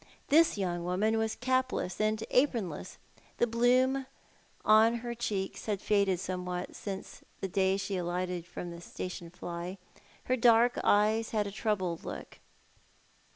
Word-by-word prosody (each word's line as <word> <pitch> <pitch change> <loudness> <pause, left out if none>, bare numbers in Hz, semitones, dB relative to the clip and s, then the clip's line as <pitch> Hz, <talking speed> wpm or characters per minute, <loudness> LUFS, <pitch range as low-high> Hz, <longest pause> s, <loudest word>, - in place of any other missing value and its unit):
Tliis 325 -3 +5
young 175 -3 -1
woman 210 +5 +1
was 220 0 -1
capless 255 -7 0
and 215 0 +2
apronless. 230 - 0 0.4
The - - +4
bloom 255 +3 +2 0.6
on 220 +2 +6
her 240 - -2
cheeks 205 -5 -3
had 205 -2 0
faded 200 -3 +2
somewhat 180 -1 -4
since 195 -2 -7 0.2
the 195 - -2
day 190 +1 +2
she 200 -1 -2
alighted 180 0 -2
from 175 -1 -6
the 170 0 -9
station 175 -1 -6
fly. 175 +2 -6 0.5
Her 255 - +1
dark 235 0 +5
eyes 215 +2 +3
had 210 -2 0
a 200 - -4
troubled 195 -5 -1
look. - - -8
205 Hz, 140 wpm, -31 LUFS, 180-230 Hz, 0.6 s, on